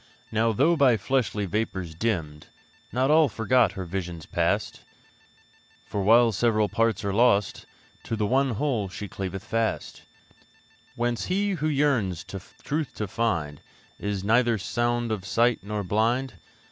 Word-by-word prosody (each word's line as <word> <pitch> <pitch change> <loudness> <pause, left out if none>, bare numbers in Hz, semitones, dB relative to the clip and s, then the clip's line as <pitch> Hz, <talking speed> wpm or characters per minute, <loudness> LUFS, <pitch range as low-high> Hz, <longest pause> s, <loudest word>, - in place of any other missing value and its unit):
Now, 110 +1 +2
though 145 +10 +3
by 135 -7 +4
fleshly 105 -2 -1
vapours 95 -4 -3
dimmed, 80 -6 -3 0.4
Not 130 +4 +1
all 155 -2 +5
forgot 115 -1 +2
her 95 -2 -5
visions 85 -2 -5
past; - - -1 1.0
For 100 - -3
while 115 +4 +5
the - - -8
several 110 0 +2
parts 115 -2 0
are 100 - -1
lost, 105 -3 +2 0.4
To 115 - -2
the 105 -1 0
one 135 +5 +2
whole 115 -6 -1
she 105 +2 -6
cleaveth 95 0 -5
fast; 115 0 -2 0.9
Whence 120 -1 -1
he 200 +2 0
who 155 -5 -1
yearns 130 - +1
the 95 0 -8 0.2
truth 150 -2 -3
to 105 - -3
find 85 -10 -2 0.4
Is 100 -2 -3
neither 115 +2 +3
sound 120 +3 -1
of 105 -4 -2
sight 115 +6 +2
nor 105 +1 -4
blind. 115 +7 0
110 Hz, 145 wpm, -26 LUFS, 95-125 Hz, 1.0 s, all